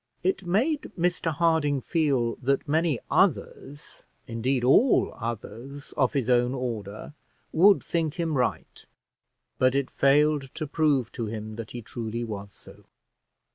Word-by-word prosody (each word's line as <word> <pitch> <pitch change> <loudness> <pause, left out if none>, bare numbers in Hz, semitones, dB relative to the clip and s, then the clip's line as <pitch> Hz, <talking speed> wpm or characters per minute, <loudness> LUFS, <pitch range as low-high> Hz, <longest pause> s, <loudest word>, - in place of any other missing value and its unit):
It 190 0 -1
made 265 - 0
Mr 175 -1 0
Harding 155 -3 +1
feel 135 -6 0
that 135 +3 -1
many 160 -1 +1
others, 145 +1 -1 0.2
indeed, 125 +1 -1
all 180 - +4
others 120 +4 -7
of 130 -4 +1
his 135 -5 -1
own 125 +1 +2
order, 110 -2 -5 0.4
would 195 +5 +5
think 165 -3 -1
him 165 -3 -1
right; 125 -2 -2 0.7
but 130 +1 +3
it 140 -1 -1
failed 145 0 +2
to 155 - -3
prove 145 -5 +1
to 115 - -4
him 110 0 -6
that 115 -2 -6
he 120 -2 -7
truly 115 +1 -5
was 100 -3 -6
so. - - -17
135 Hz, 135 wpm, -26 LUFS, 120-160 Hz, 0.7 s, would